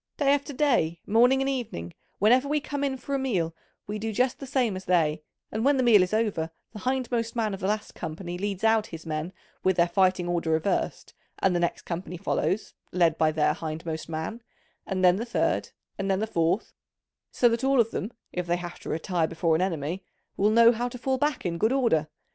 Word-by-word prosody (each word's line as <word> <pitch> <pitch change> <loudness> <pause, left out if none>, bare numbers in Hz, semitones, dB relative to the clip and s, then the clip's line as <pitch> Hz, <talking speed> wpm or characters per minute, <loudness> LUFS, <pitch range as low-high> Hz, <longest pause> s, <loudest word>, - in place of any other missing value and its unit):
Day 280 -1 +4
after 285 +1 -1
day, 245 - +1
morning 245 +5 +4
and - - -1
evening, 210 - -4 0.2
whenever 250 +7 +4
we 300 +1 +1
come 285 0 -4
in 270 -1 0
for 280 +2 -6
a 275 - +1
meal 180 -11 -1 0.3
we 210 +1 -4
do 220 +1 -2
just 250 +4 +1
the 275 - -7
same 250 -6 +1
as 190 0 -7
they, 160 -4 +2 0.3
and 220 +1 -2
when 280 +1 +4
the 260 - +2
meal 225 -5 +7
is 180 - 0
over 210 -7 0 0.2
the 215 - -7
hindmost 245 -1 -1
man 220 -3 0
of 195 - -5
the 190 - -2
last 210 +1 -2
company 175 +2 -6
leads 195 +1 -3
out 220 -1 +3
his 165 0 -9
men 155 +2 -3 0.3
with 190 -1 +2
their 170 0 +4
fighting 185 0 +2
order 170 -2 -1
reversed, 160 +5 -1 0.2
and 185 -2 +2
the - - +2
next 170 -1 -1
company 180 +1 -5
follows, 185 +1 -1 0.2
led 170 -3 +3
by 155 -1 +4
their 150 -1 +2
hindmost 160 0 -5
man, 160 +9 -4 0.5
and 185 -1 +1
then 180 +1 +6
the 225 - -2
third, 240 0 0 0.3
and 195 0 -1
then 190 0 +2
the 215 - 0
fourth: 175 -1 0 0.6
so 245 - +3
that 235 +1 0
all 270 -1 +3
of 230 -1 +3
them, 210 - -3 0.2
if 180 -1 -3
they 175 +1 +1
have 175 0 -7
to - - -8
retire 165 0 0
before 165 0 0
an 160 - +1
enemy, 175 0 -2 0.3
will 205 +2 +3
know 230 +1 +7
how 240 +1 -2
to 250 - -8
fall 260 +1 -1
back 295 -5 0
in 170 -1 -2
good 220 +5 +3
order. 230 - +2
195 Hz, 220 wpm, -27 LUFS, 170-240 Hz, 0.6 s, meal